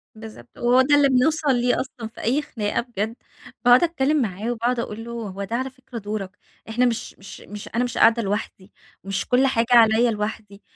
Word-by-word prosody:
بالضبط، 220 +2 -12
وهو 245 +2 +4
ده 290 +2 +4
اللي 285 -1 +4
بنوْصَل 275 +2 +2
ليه 245 0 +1
أصلًا 245 -3 -7
في 225 - -12
أي 260 +6 +1
خناقة 210 -7 -2
بجد. 225 -2 -4 0.5
باقعد 245 +3 +7
أتكلم 305 -3 +1
معاه 215 +2 -3
وباقعد 240 +1 -1
أقول 225 -1 -5
له: 235 - -8
"هو 205 -4 -5
ده 225 +4 -4
على 260 +2 -2
فكرة 260 -2 -11
دورك. 205 -2 -5 0.3
إحنا 245 +3 +2
مش 235 -2 -2
مش 195 - -11
مش 210 +1 -9
أنا 240 - +2
مش 245 - -4
قاعدة 230 +1 +5
لوحدي، 205 -1 -4 0.3
مش 195 0 -3
كل 255 +2 +3
حاجة 230 -3 +1
عليَّ 230 0 +5
لوحدي." 210 -1 -5
235 Hz, 195 wpm, -23 LUFS, 210-250 Hz, 0.5 s, باقعد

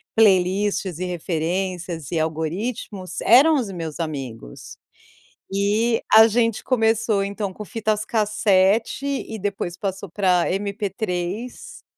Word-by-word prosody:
playlists, 195 -3 +2
e 185 - -2
referências, 175 -1 -3
e 165 - 0
algoritmos 180 +5 -3
eram 280 +8 +6
os 235 -8 -1
meus 165 -3 -6
amigos. 135 - -6 0.8
E 210 +4 +1
a 220 +1 +9
gente 230 0 +1
começou, 225 -4 +1
então, 200 -1 -4
com 210 - -8
fitas 215 0 -2
cassete 210 +2 +2 0.2
e 220 -1 -7
depois 195 -3 -3
passou 195 0 -4
pra 180 -1 +2
MP3. 200 +1 -4
200 Hz, 110 wpm, -22 LUFS, 180-220 Hz, 0.8 s, a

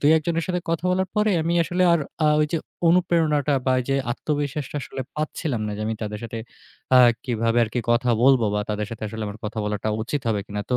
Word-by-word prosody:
২ 145 - +4
১ 160 - 0
জনের 165 -1 0
সাথে 180 -1 -1
কথা 165 0 -1
বলার 190 +1 +1
পরে 210 0 +3
আমি 170 +2 0
আসলে 180 +2 0
আর 170 - +3 0.3
আ - - +5
ওই 150 - +3
যে 165 - +1 0.3
অনুপ্রেরণাটা 165 -5 +2
বা 130 - +4
ওইযে 135 +2 -1 0.2
আত্মবিশ্বাসটা 145 0 -3
আসলে 135 - -7 0.2
পাচ্ছিলাম 150 -4 -2
না 105 - -3
যে 105 - -4
আমি 110 - -1
তাদের 105 0 -4
সাথে 115 0 -5 0.6
আ - - +9 0.3
কীভাবে 115 -1 +1
আর - - -6
কি 125 - +1
কথা 120 +1 +2
বলবো 130 -3 +5
বা 105 - +1
তাদের 105 0 -2
সাথে 115 - -8
আসলে 110 +1 -6
আমার 105 +1 -7
কথা 110 +1 -4
বলাটা 105 +1 -2
উচিত 140 +6 -2
হবে 105 -2 +1
কিনা। 105 -1 -4
তো 125 - +3
135 Hz, 230 wpm, -23 LUFS, 110-160 Hz, 0.6 s, আ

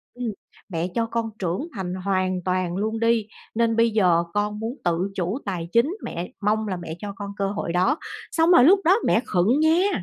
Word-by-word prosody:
ừm, 245 -3 -3 0.4
"mẹ 170 -1 -2
cho 230 -1 +1
con 225 -1 -2
trưởng 185 - -2
thành 185 -1 -3
hoàn 185 -2 0
toàn 185 -1 -1
luôn 220 +2 -2
đi, 230 -2 +2 0.3
nên 230 0 +2
bây 230 0 +4
giờ 180 -5 +3
con 210 0 -1
muốn 230 +3 -3
tự 175 +3 0
chủ 185 +7 -2
tài 175 -4 -4
chính. 280 - +2
Mẹ, 175 +1 -5
mong 215 +1 +1
là 185 - -2
mẹ 160 -2 -6
cho 205 +1 -6
con 200 -1 -6
cơ 195 0 -1
hội 170 -4 -3
đó." 230 - +2 0.3
Xong 330 +1 +3
rồi 250 -8 +7
lúc 385 +5 +6
đó 370 +5 +6
mẹ 225 - +4
khựng 210 +10 +2
nha! 325 - +3
210 Hz, 210 wpm, -24 LUFS, 185-235 Hz, 0.4 s, rồi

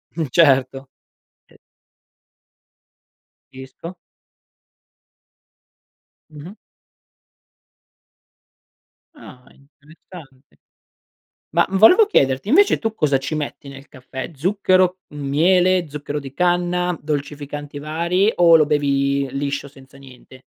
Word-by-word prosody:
Mh, 160 -2 -2
certo. 135 -4 +2 0.6
e - - -22 2.0
Capisco. 130 +7 -11 2.4
Mh-mh. 155 +7 -12 2.6
Ah 125 - -15
interessante. 145 -1 -18 1.0
Ma 170 - +3
volevo 220 - +5
chiederti 135 - 0
invece 400 - +4
tu 225 -1 -4
cosa 145 -8 +1
ci 135 +4 -5
metti 145 -2 -6
nel 135 +1 -12
caffè? 130 +2 -9
Zucchero, 185 +2 +1 0.2
miele, 175 +5 +1
zucchero 145 0 -6
di 135 -1 -10
canna, 180 0 0
dolcificanti 145 0 -6
vari 170 +7 0
o 170 -2 +6
lo 155 - +3
bevi 140 -2 0
liscio, 140 0 -4
senza 135 -1 -18
niente? 130 -1 -17
150 Hz, 90 wpm, -19 LUFS, 140-180 Hz, 2.6 s, o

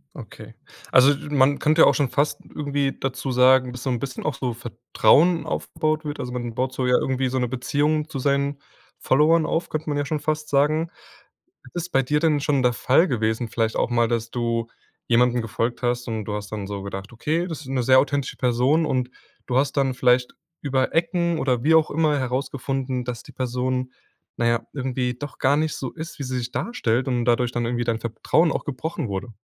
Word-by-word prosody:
Okay, - - -11 0.4
also, 135 +3 +6
du 145 - -8
man 140 +1 +3
könnte 155 +1 +3
ja - - +8
auch - - +5
schon 140 -4 +1
fast 145 +1 0 0.2
irgendwie 145 -2 -1
dazu 130 0 -3
sagen, 125 0 +5
dass 125 0 -8
so 135 - -1
'n 120 -2 -1
bisschen 130 -1 -5
auch 155 - 0
so 125 -3 -2
Vertrauen 125 - +2
aufgebaut 155 -1 -2
wird. 145 0 -5
Also, 125 - -4
man 120 -2 -5
baut 130 0 -1
so 130 -1 -1
ja 125 - +4
irgendwie 130 0 0
so 130 - -2
'ne 125 - 0
Beziehung 150 +5 0
zu 140 - -5
seinen 140 +1 0 0.4
Followern 155 +4 +3
auf, 165 - -1
könnte 155 0 -3
man 145 - -1
ja 145 - -1
schon 150 +2 -2
fast 155 0 -2
sagen. 155 +4 +2 0.8
ist 175 0 -4
bei 135 0 +3
dir 150 +4 +1
denn 155 -2 +2
schon 140 -2 +1
der 125 -1 +3
Fall 135 +9 +3
gewesen 115 -3 -1
vielleicht 115 0 -1
auch - - +1
mal, 120 -1 +2
dass 115 0 -2
du 115 -1 -1 0.4
jemandem 120 0 +3
gefolgt 115 +2 -2
hast 120 0 -1
und 110 -3 -3
du 105 - -4
hast 105 -1 -6
dann 105 -2 -4
so 100 -1 -5
gedacht: 100 +2 -7
„Okay, 155 +9 -1
das 160 -2 -6
ist 135 - -12
'ne 135 -2 0
sehr 130 +1 +6
authentische 140 -1 -1
Person“, 130 +6 +2
und 130 -3 -1 0.4
du 125 - +1
hast 135 0 +1
dann 135 -2 +2
vielleicht 125 0 +2 0.3
über 130 -2 0
Ecken 170 0 +1
oder 125 -4 0
wie 160 +2 +4
auch 160 -1 +4
immer 150 -1 +1
herausgefunden, 130 0 -2
dass 120 -2 -5
die - - -13
Person, 130 0 -2 0.5
na 120 - 0
ja, 115 0 +1
irgendwie 130 -2 -2
doch 145 +2 -8
gar 140 +2 +3
nicht 155 0 0
so 130 - -5
ist, 165 -1 -8
wie 140 - -3
sie 130 0 -3
sich 120 0 -4
darstellt 130 - -1
und 120 -2 0
dadurch 120 0 +2
dann 120 -1 -2
irgendwie 120 0 -1
dein 115 -1 0
Vertrauen 120 +9 +1
auch - - -2
gebrochen 150 +2 -4
wurde? 100 +4 -5
130 Hz, 215 wpm, -23 LUFS, 120-145 Hz, 0.8 s, ja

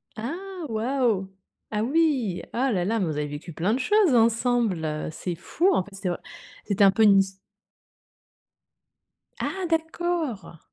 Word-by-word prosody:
Ah, 350 - -6
waouh! 225 -3 0 0.4
Ah 210 0 0
oui, 265 - +1
ah 260 +2 0
là 185 -5 0
là 225 +5 0
mais 190 - +1
vous 160 - -2
avez 150 0 -1
vécu 145 +4 -8
plein 180 +8 0
de 250 - 0
choses 380 0 +3
ensemble. 225 -9 +1
C'est 175 +2 -4
fou 335 - +1
en - - +2
fait, 205 - -16
c'est 195 -1 -3
vr 175 - -2 0.5
c'était 200 -1 +2
un 195 - +7
peu 220 +3 +2
une 200 -2 +7
his 195 0 -1 2.0
Ah 380 -1 -3
d'accord! 320 - -2
225 Hz, 155 wpm, -25 LUFS, 190-280 Hz, 2.0 s, un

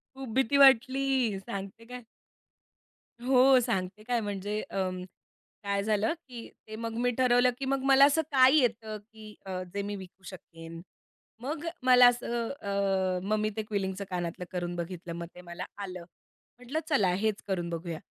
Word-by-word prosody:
खूप 270 -2 -7
भीती 265 +1 +2
वाटली, 265 -4 +4
सांगते 195 +3 -7
काय. 250 0 -9 1.2
हो, 260 0 +6
सांगते 205 -4 -2
काय 240 +1 0
म्हणजे 205 0 -3
अं, 185 -1 -2 0.6
काय 200 0 -1
झालं 215 +4 +1 0.2
की 235 -2 -9 0.2
ते 215 0 -8
मग 230 0 -4
मी 245 +1 +2
ठरवलं 250 0 +4
की 275 - -3
मग 270 0 0
मला 270 0 +7
असं 305 +3 +2
काय 260 0 +6
येतं 220 -4 0
की 215 0 -14
अ, 185 -1 -4
जे 200 - -1
मी 205 0 -4
विकू 190 0 -12
शकेन? 165 -3 -10 0.6
मग 295 +4 -4 0.2
मला 250 -1 +7
असं 240 -1 -1
अ, 195 -2 0
मग 210 +3 0
मी 215 - 0
ते 220 - -1
क्विलिंगचं 200 -2 -3
कानातलं 175 -1 -3
करून 175 -1 -3
बघितलं. 170 0 -6
मग 170 0 -5
ते 180 - -11
मला 175 -1 -7
आलं, 185 -3 -6 0.5
म्हटलं 250 +5 -4
चला 245 - +3
हेच 210 +2 -1
करून 175 -3 -2
बघूया 170 -1 -5
215 Hz, 160 wpm, -29 LUFS, 185-250 Hz, 1.2 s, मला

